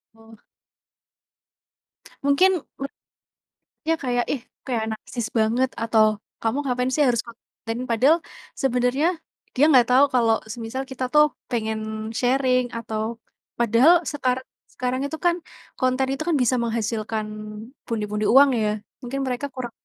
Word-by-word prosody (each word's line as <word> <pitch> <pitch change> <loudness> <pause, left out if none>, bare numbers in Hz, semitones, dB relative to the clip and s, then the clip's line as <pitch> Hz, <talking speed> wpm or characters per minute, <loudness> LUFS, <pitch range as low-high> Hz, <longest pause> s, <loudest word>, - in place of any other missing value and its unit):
Oh. 225 0 -16 1.9
Mungkin 285 +7 +5 0.3
ber 275 - -2 1.0
ya 325 - +3
kayak, 245 -4 -1
"Ih, 260 -5 -3 0.3
kayak 230 -3 0
narsis 220 +1 -5
banget," 235 +3 +2
atau, 215 -2 +3 0.2
"kamu 225 +5 0
ngapain 250 +1 0
sih 300 - 0
harus 235 -1 +1
konten?" 235 +1 -8
Padahal 270 +9 +4 0.4
sebenarnya 250 +3 +2 0.5
dia 285 - +5
nggak 245 -3 +6
tahu 265 +3 +7
kalau 230 -2 +4 0.2
semisal 240 +3 -5
kita 265 -1 -5
tuh 300 +2 +4 0.2
pengen 220 -1 -3
sharing 255 0 +2
atau 225 0 -3 0.4
padahal 260 +10 +5
sekarang 255 -2 -1 0.3
sekarang 255 +1 -2
itu 320 - -5
kan 345 0 +4 0.4
konten 255 +1 +1
itu 275 - -3
kan 330 - +2
bisa 250 +1 +2
menghasilkan 225 -2 -2 0.6
pundi-pundi 210 -2 -2
uang 275 +3 +7
ya 210 -1 +1 0.3
mungkin 270 +2 -4
mereka 255 +2 -2
kurang 250 -2 -5
245 Hz, 130 wpm, -23 LUFS, 225-265 Hz, 1.9 s, tahu